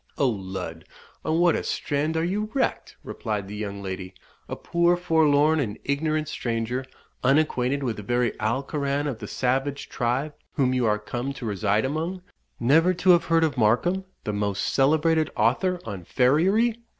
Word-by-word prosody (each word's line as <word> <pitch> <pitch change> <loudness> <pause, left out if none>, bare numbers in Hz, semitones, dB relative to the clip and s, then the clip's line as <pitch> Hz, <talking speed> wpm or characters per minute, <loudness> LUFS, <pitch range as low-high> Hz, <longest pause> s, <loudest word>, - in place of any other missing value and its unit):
"O 140 - +3
lud! 95 -7 -5 0.4
on 160 - 0
what 175 -1 +4
a - - -1
strand 150 +2 -1
are 160 - +1
you 205 +5 -1
wrecked!" 270 - -1
replied 105 -4 -4
the 105 - -7
young 100 -1 -5
lady. 95 -1 -6 0.3
"A - - -3
poor 170 +1 +2
forlorn 160 -3 +3
and 110 -7 -2
ignorant 155 +2 0
stranger, 120 -1 -2 0.4
unacquainted 135 -1 +2
with 120 -4 -2
the - - -5
very 120 +3 0
Alcoran 140 +5 -1
of 135 -7 -3
the - - -7
savage 135 +3 -1
tribe 130 +5 -1 0.2
whom 130 -2 +1
you 125 -2 +1
are 105 0 +2
come 120 +5 -4
to 135 -3 -8
reside 105 +1 +1
among 165 +6 -3 0.4
Never 160 +9 +4
to 185 +1 +4
have 175 -1 +4
heard 165 -1 +3
of 155 -4 0
Markham, 150 - +2 0.2
the 105 - -3
most 100 -1 -1
celebrated 155 +3 +3
author 155 - +1
on 100 -5 -6
farriery! 190 - +2
135 Hz, 165 wpm, -25 LUFS, 110-160 Hz, 0.4 s, what